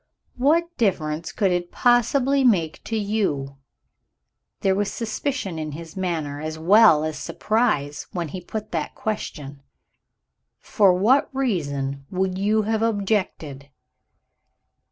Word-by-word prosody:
"What 335 Hz, +6 st, +2 dB
difference 165 Hz, -7 st, -1 dB
could 195 Hz, -4 st, +1 dB
it 175 Hz, 0 st, -2 dB
possibly 260 Hz, +3 st, +3 dB
make 175 Hz, -11 st, +2 dB
to 225 Hz, -, -2 dB
you?" 190 Hz, -11 st, -1 dB, 1.0 s
There 195 Hz, -, +3 dB
was 205 Hz, +1 st, -1 dB
suspicion 220 Hz, -, -3 dB
in 155 Hz, -1 st, -5 dB
his 165 Hz, +3 st, -9 dB
manner, 160 Hz, -6 st, -3 dB
as 155 Hz, 0 st, -4 dB
well 175 Hz, -1 st, +6 dB
as 155 Hz, -1 st, -3 dB
surprise, 210 Hz, -, -1 dB
when 170 Hz, -3 st, -3 dB
he 180 Hz, +5 st, -6 dB
put 215 Hz, +4 st, -6 dB
that 160 Hz, -3 st, -3 dB
question. 145 Hz, -10 st, -5 dB, 1.0 s
"For 200 Hz, -4 st, +3 dB
what 220 Hz, +10 st, +3 dB
reason 140 Hz, -, -2 dB
would 185 Hz, 0 st, -1 dB
you 215 Hz, +2 st, +2 dB
have 220 Hz, +1 st, -1 dB
objected?" 195 Hz, -10 st, -1 dB
190 Hz, 120 wpm, -23 LUFS, 155-220 Hz, 1.0 s, well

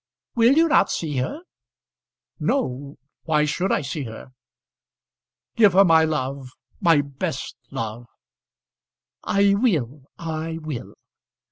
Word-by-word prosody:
"Will 235 Hz, +2 st, +5 dB
you 325 Hz, +3 st, +4 dB
not 295 Hz, -10 st, +4 dB
see 150 Hz, -5 st, -3 dB
her?" 210 Hz, -, -3 dB, 1.0 s
"No. 140 Hz, -, -2 dB, 0.3 s
Why 150 Hz, -2 st, +2 dB
should 175 Hz, +6 st, -1 dB
I -, -, +2 dB
see 140 Hz, 0 st, -4 dB
her? 110 Hz, +3 st, -10 dB, 1.2 s
Give 210 Hz, -6 st, +5 dB
her 195 Hz, +2 st, +6 dB
my 160 Hz, -2 st, +5 dB
love 140 Hz, -4 st, -3 dB, 0.3 s
my 165 Hz, -6 st, +4 dB
best 140 Hz, -1 st, -5 dB
love 115 Hz, +2 st, -5 dB, 0.6 s
" -, -, -61 dB
"I 200 Hz, 0 st, +5 dB
will 155 Hz, -, 0 dB
I 160 Hz, 0 st, -4 dB
will." 155 Hz, -6 st, -7 dB
155 Hz, 120 wpm, -23 LUFS, 135-195 Hz, 1.2 s, her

